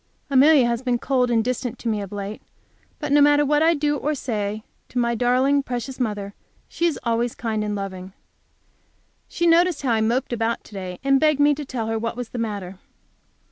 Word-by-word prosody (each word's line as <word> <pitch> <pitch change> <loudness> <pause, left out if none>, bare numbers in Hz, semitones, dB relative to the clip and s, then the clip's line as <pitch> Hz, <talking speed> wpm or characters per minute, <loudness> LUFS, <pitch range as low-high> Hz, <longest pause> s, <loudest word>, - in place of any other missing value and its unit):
Amelia 275 0 +6
has 235 0 -1
been 250 -2 0
cold 250 0 +1
and 230 -2 +2
distant 250 0 -3
to - - -7
me 215 -2 0
of 200 - -7
late, 205 +1 -6 0.6
but 295 -3 -4
no 290 0 +5
matter 290 0 +5
what 295 +1 +2
I 330 +1 +4
do 295 0 0
or 300 +2 -1
say 215 -5 -3 0.3
to - - -7
my 235 -1 +2
darling, 255 +4 +2
precious 255 0 -5
mother, 205 -4 -3 0.3
she 340 - 0
is 325 - -2
always 235 0 0
kind 220 -2 -2
and 210 -1 -2
loving. 190 -1 -6 1.1
She 345 - -2
noticed 340 -2 +3
how 255 - +1
I 220 -1 +2
moped 240 +3 0
about 230 0 -1
to - - -17
day, 185 -2 -6
and 275 0 +3
begged 305 -1 +2
me 290 0 +5
to 290 0 -6
tell 245 -4 -4
her 225 0 -2
what 230 +1 -3
was 245 -2 -5
the 245 - -6
matter. 200 -4 -4
245 Hz, 210 wpm, -23 LUFS, 220-280 Hz, 1.1 s, Amelia